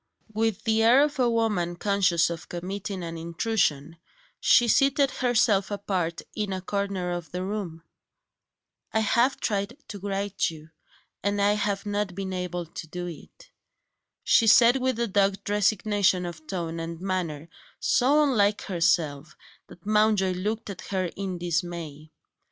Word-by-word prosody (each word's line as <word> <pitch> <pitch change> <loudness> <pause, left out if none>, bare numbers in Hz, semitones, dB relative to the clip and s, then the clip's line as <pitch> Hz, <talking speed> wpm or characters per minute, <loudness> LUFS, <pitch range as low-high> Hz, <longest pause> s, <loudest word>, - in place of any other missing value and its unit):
With 220 -1 -1
the 220 0 +2
air 240 +5 +6
of 295 -2 -2
a 245 -2 +3
woman 210 -7 0
conscious 180 -4 +2
of 165 -2 -7
committing 190 +2 -5
an 165 -1 -6
intrusion, 165 -3 -1 0.4
she 240 - +5
seated 275 +2 +3
herself 230 -6 +2
apart 190 -5 -2
in 210 -2 -2
a 190 - -2
corner 195 -1 -2
of 175 -2 -5
the 180 +1 -3
room. 190 -5 -5 1.1
"I 220 - +1
have 235 +5 +2
tried 200 +2 -2
to 205 - -7
write 200 0 -4
to 165 - +1
you, 155 +1 -14 0.5
and 205 +1 -1
I 200 +1 +3
have 205 -1 -1
not 205 -2 -2
been 190 -1 -4
able 180 -1 -3
to 165 0 -9
do 175 +2 -5
it." - - -11 0.7
She 225 - +4
said 235 +2 +7
that 265 - -2
with 255 -2 0
a 235 - +2
dogged 195 -1 +1
resignation 205 -2 +2
of 160 -3 -8
tone 170 -3 -4
and 165 0 -5
manner, 175 -5 -3 0.3
so 285 +5 +3
unlike 210 -7 +2
herself 165 -5 0 0.3
that 175 - -16
Mountjoy 210 -2 +3
looked 210 +4 -3
at 185 - -9
her 185 -3 -1
in 190 -2 -4
dismay. 170 -3 -4
195 Hz, 155 wpm, -26 LUFS, 175-215 Hz, 1.1 s, said